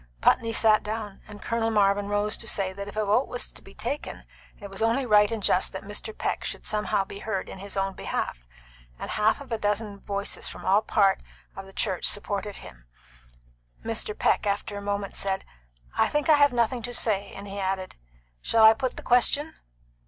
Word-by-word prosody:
Putney 230 - +3
sat 220 -1 +5
down, 210 -2 -5
and 205 -1 -11
Colonel 230 -1 0
Marvin 200 -2 +2
rose 205 +1 0
to 230 - -4
say 195 -3 0
that 200 +1 -7
if 205 - -9
a 215 - +1
vote 215 +6 +2
was 245 - -2
to - - -14
be 195 - -15
taken, 280 +5 -4 0.4
it 205 - -8
was 195 +1 -6
only 230 +4 +2
right 210 -2 +5
and 225 -3 -3
just 185 - +3
that 190 - -6
Mr. 210 +2 -4
Peck - - -2
should - - -5
somehow 210 -2 0
be 200 - -9
heard 205 -3 -3
in - - -9
his 200 0 -6
own 195 0 0
behalf, - - -4 0.5
and - - -6
half 215 +4 +2
a 255 -5 -4
dozen 205 0 -1
voices 200 0 -2
from - - -8
all 200 +3 +4
parts 195 -3 +2 0.3
of 195 0 -8
the - - -13
church 190 -2 -1
supported 205 0 0
him - - -12 1.0
Mr. 225 -2 -1
Peck, - - +2
after 205 +1 -2
a 200 - -5
moment, 200 -1 -3
said, 195 -1 -1 0.5
"I - - +3
think 295 +1 -1
I 310 - +8
have 285 -1 +5
nothing 240 0 +1
to 245 +1 -5
say;" 200 -4 0
and 200 +1 -8
he 200 0 -6
added, 190 -1 -2 0.5
"Shall 225 -1 +3
I 220 0 +10
put 255 +2 -3
the - - -7
question?" 280 +6 +3
205 Hz, 205 wpm, -26 LUFS, 195-225 Hz, 1.0 s, I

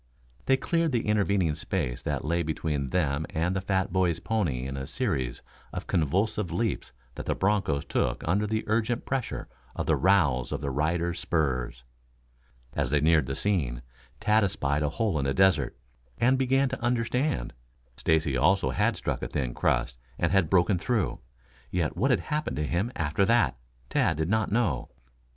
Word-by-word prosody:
They 135 - +5
cleared 165 +2 0
the 115 - 0
intervening 100 -6 +2
space 75 -5 -3
that - - -2
lay 85 +2 +1
between 75 -3 -2
them 80 -3 0
and 85 +4 -1
the 95 - 0
fat 95 -2 0
boy's 90 -3 +2
pony 85 - -1
in 70 0 -4
a 65 0 -5
series 65 -3 -2 0.3
of - - -5
convulsive 95 +5 0
leaps 115 -4 -2 0.2
that - - -7
the - - +1
bronchos 95 -8 +1
took - - -1
under 100 +5 +2
the 110 +1 -1
urgent 115 +2 0
pressure 130 -3 -3 0.3
of - - -2
the - - +3
rowels 80 -10 +3
of - - -3
their 70 - -2
riders' 85 +4 0
spurs. 65 -7 -1 0.9
As 70 -3 -1
they 75 +2 +3
neared 75 -2 +3
the 65 - -2
scene 70 -13 0 0.4
Tad 105 0 +3
espied 75 -7 0
a 75 - +1
hole 95 0 0
in 70 - -1
the 70 - 0
desert, 95 -11 +3 0.4
and 130 +3 +4
began 135 +1 +2
to 130 - -5
understand. 120 - 0 0.4
Stacy 80 -2 +1
also 70 +1 +3
had - - +1
struck - - -2
a - - -2
thin 65 -5 -2
crust - - 0 0.2
and - - +1
had 95 -5 +3
broken 90 0 +3
through. 110 +3 0 0.5
Yet 85 -4 -1
what 125 +10 +1
had 130 - +3
happened 150 0 -2
to 75 - -1
him 90 +10 -1
after 80 +4 +1
that, 120 +3 +3 0.3
Tad - - +2
did 80 +1 -1
not 110 -1 +1
know. 100 - 0
85 Hz, 175 wpm, -27 LUFS, 70-105 Hz, 0.9 s, They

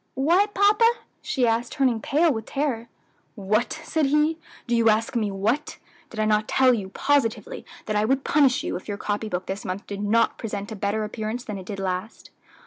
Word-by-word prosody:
"What, 355 +10 +2
papa?" 415 +3 +5 0.3
she 260 -4 0
asked, 230 +1 0
turning 255 -6 +1
pale 310 +5 +2
with 220 -2 -5
terror. 270 -5 -2 0.5
"What!" 215 +7 0
said 315 -3 0
he! 300 +3 +2 0.3
"do 240 - 0
you 230 -1 +4
ask 225 +5 +1
me 215 -3 +1
what? 220 +10 -1 0.3
Did 220 - -8
I 215 - +2
not 215 0 +2
tell 260 -1 +4
you 200 -5 -3
positively 285 - 0 0.2
that 215 - -2
I 210 - +2
would 270 +3 +1
punish 285 -1 +3
you 350 - -3
if - - -7
your 205 -1 -3
copy 210 +1 -3
book 180 -1 -3
this 195 +2 -5
month 185 +2 -5
did 200 0 -6
not 225 +3 +2
present 205 -2 -5
a - - -4
better 205 +2 -1
appearance 220 +3 -4
than 210 -5 -6
it 185 - -11
did 200 - -5
last?" 190 +2 -4
230 Hz, 205 wpm, -24 LUFS, 210-275 Hz, 0.5 s, papa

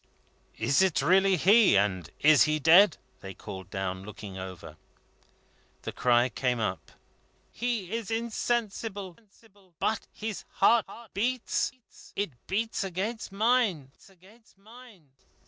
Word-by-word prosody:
"Is 135 +9 +2
it 190 -4 +2
really 190 +2 +4
he, 200 - +5
and 95 -4 0
is 155 0 +6
he 155 0 +1
dead?" 165 +4 +6 0.2
they 95 -1 -9
called 95 -1 -9
down, 95 -1 -4
looking 100 -1 -9
over. 95 -4 -9 1.1
The - - -4
cry 120 0 +3
came 125 0 -1
up: 105 -4 -4 0.6
"He 230 -6 -3
is 230 -3 -3
insensible; 225 -4 -3 0.6
but 220 -1 -1
his 220 -2 -6
heart 225 +3 +3 0.3
beats. 255 - -1 0.4
It 200 -4 -2 0.2
beats 220 +2 -1
against 195 +4 -4
mine." 205 - +1
190 Hz, 110 wpm, -28 LUFS, -, 1.1 s, is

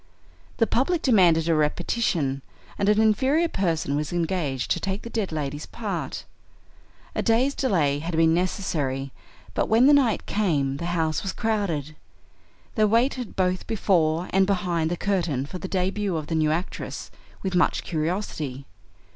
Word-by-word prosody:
The 225 - +4
public 275 - 0
demanded 175 - +4
a 165 - +3
repetition, 150 - 0 0.4
and 200 - +2
an 210 0 +4
inferior 265 +10 +3
person 165 - -1
was 150 +1 -2
engaged 165 -6 -1
to - - +2
take 195 +1 -3
the 235 - -8
dead 215 -6 -2
lady's 150 -1 -4
part. 215 -4 -4 0.9
A - - -1
day's 250 +4 +2
delay 160 - +1
had 165 +2 -4
been 160 0 +4
necessary, 150 -7 -1 0.4
but - - -1
when 225 +3 +5
the 290 - +7
night 260 -7 +3
came 145 -10 0
the 170 - -4
house 160 -2 0
was 195 -1 -3
crowded. 185 - -1 0.8
They 215 -3 +3
waited 240 +2 +1
both 185 0 0
before 175 -6 +1
and 190 0 +3
behind 180 -5 0
the 175 - -2
curtain 170 -10 0
for 180 +5 -7
the 190 - -5
debut 190 0 -1
of 155 - -4
the 165 - -4
new 155 -1 +2
actress, 170 +5 -4 0.3
with 190 -1 -2
much 180 - +2
curiosity. 155 -5 -3
180 Hz, 155 wpm, -25 LUFS, 155-210 Hz, 0.9 s, the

